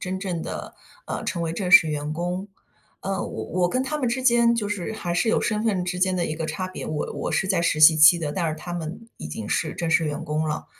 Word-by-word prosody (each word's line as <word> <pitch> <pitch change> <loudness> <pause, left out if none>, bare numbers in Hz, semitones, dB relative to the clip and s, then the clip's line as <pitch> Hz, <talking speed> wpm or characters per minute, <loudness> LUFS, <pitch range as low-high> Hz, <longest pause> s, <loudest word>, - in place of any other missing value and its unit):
真 185 +1 -3
正 180 -4 -3
地， - - -6 0.3
呃， - - -4
成 170 - -2
为 165 - -2
正 180 +1 -3
式 170 -3 +8
员 150 0 -3
工。 180 +4 -3 0.5
呃， 195 -1 -3
我 110 - -5 0.2
我 175 - +3
跟 255 +7 0
他 300 +3 -3
们 255 - 0
之 255 +2 -2
间 235 -2 +4
就 210 -3 -2
是 205 0 -3
还 175 -5 -4
是 200 +6 +1
有 - - +2
身 215 0 -1
份 195 -5 0
之 180 0 -3
间 185 0 +2
的 175 -2 0
一 155 - -3
个 160 - -3
差 185 +3 -4
别。 185 - -7
我 150 -1 -3
我 - - -3
是 190 - 0
在 185 -4 +2
实 155 -2 0
习 155 +1 +8
期 155 +3 +8
的， 155 -3 -3
但 170 +1 -1
是 155 - -2
他 175 +3 -8
们， 175 +6 -6
已 - - -7
经 105 +8 -6
是 155 - -1
正 170 -1 -3
式 165 0 +3
员 150 -1 -3
工 155 +1 -1
了。 150 - -3
175 Hz, 290 characters per minute, -24 LUFS, 155-195 Hz, 0.5 s, 式